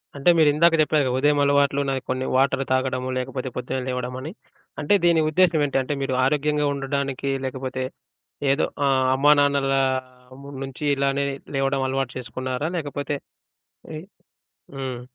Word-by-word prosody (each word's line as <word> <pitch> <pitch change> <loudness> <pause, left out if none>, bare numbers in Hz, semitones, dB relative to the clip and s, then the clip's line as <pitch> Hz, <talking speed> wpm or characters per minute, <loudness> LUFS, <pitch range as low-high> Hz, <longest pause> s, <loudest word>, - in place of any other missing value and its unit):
అంటే 140 +4 +2
మీరు 155 -2 +5
ఇందాక 165 +2 +4
జెప్పారుగా, 150 -4 +2
ఉదయం 145 +2 +2
అలవాట్లు 140 0 +2
నాయి 135 -1 -1
కొన్ని 130 0 -1
వాటర్ 135 +1 +2
తాగడము, 130 0 0
లేకపోతే 130 0 -4
పొద్దున్నే 130 +1 -3
లేవడమని, 125 +3 -4 0.5
అంటే 150 - +2
దీని 170 -2 +4
ఉద్దేశ్యం 165 -2 +3
ఏంటి? 140 - -1
అంటే 130 +3 -3
మీరు 135 -1 -1
ఆరోగ్యంగా 150 +1 +1
ఉండడానికి 140 0 -2
లేకపోతే 130 0 -4 0.7
ఏదో 140 - +2 0.2
ఆహ్, 130 -1 +2
అమ్మానాన్నల 140 -1 +3 0.9
నుంచి 135 +2 -8
ఇలానే 140 0 0 0.3
లేవడం 135 0 0
అలవాటు 135 -1 -2
చేసుకున్నారా? 130 +3 -4
లేకపోతే 145 -1 -3 0.8
ఎయ్ 155 +3 -8 0.7
హ్మ్. 130 -3 -4
135 Hz, 130 wpm, -23 LUFS, 130-145 Hz, 0.9 s, మీరు